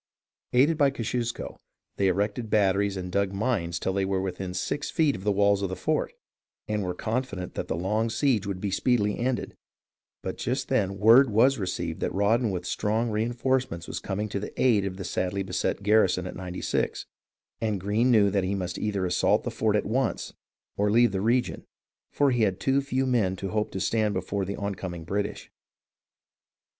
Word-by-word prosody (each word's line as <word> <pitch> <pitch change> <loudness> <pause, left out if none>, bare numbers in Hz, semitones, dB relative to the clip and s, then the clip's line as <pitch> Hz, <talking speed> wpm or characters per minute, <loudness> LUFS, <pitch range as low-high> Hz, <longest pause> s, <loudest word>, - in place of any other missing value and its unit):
Aided 145 +6 +3
by 140 -1 +5
Kosciusko, 120 -2 -3 0.4
they 100 - +2
erected 105 +5 -1
batteries 100 -1 +2
and 90 -1 -5
dug 100 0 +1
mines 100 -6 -1
till 95 - -2
they 100 0 0
were 95 0 0
within 95 -1 -4
six 140 +10 -2
feet 155 -3 +2
of 95 - -8
the 105 - +2
walls 100 0 +3
of 100 - -1
th 95 - -4
e - - -15
fort, - - 0 0.5
and 105 -1 -1
were 90 -2 -3
con 115 +7 -1
fident 95 -8 -7
that - - -4
the - - -1
long 105 +6 0
siege 115 -5 +1
would 100 0 -4
speedily 105 -2 +2
be - - -6
ended; 125 +1 -2 0.7
but - - -5
just - - -2
then 95 0 +1
word 115 +6 +7
was 115 +5 +4
received 85 -4 -3
that - - -2
Rawdon 110 +4 +2
with 90 -2 -3
strong 110 +4 0
reenforcements 120 -3 -1
was - - -4
coming 105 +2 -3
to 100 - -2
the 105 - -7
aid 110 -6 +4
of 95 -1 -4
the 95 - -5
sadly 95 +2 -2
beset 95 +1 -2
garrison 100 -4 +3
at 90 - -6
Ninety 90 -1 -6
Six, - - -1 0.6
and 110 -3 0
Greene 105 +6 +1
knew 105 -5 +5
that 100 -1 +1
he 95 +2 -1
must 90 -2 -4
either 100 -3 -1
assault 90 0 +2
the - - -3
fort 110 -1 +1
at 105 - +1
once 125 +3 -1 0.4
or 105 +1 +2
leave 120 +1 +4
the 95 -1 -2
region, 120 +3 +1 0.5
for 140 -2 +2
he 120 -2 +1
had 100 -3 +1
too 135 +1 +2
few 135 -1 -1
men 110 -8 +1
to 95 +1 -5
hope 105 +1 -1
to 95 - -3
stand 105 +1 +1
before 95 +1 -2
the 100 +2 -4
oncoming 95 -4 -5
British. 100 +4 -3
100 Hz, 195 wpm, -27 LUFS, 95-115 Hz, 0.7 s, word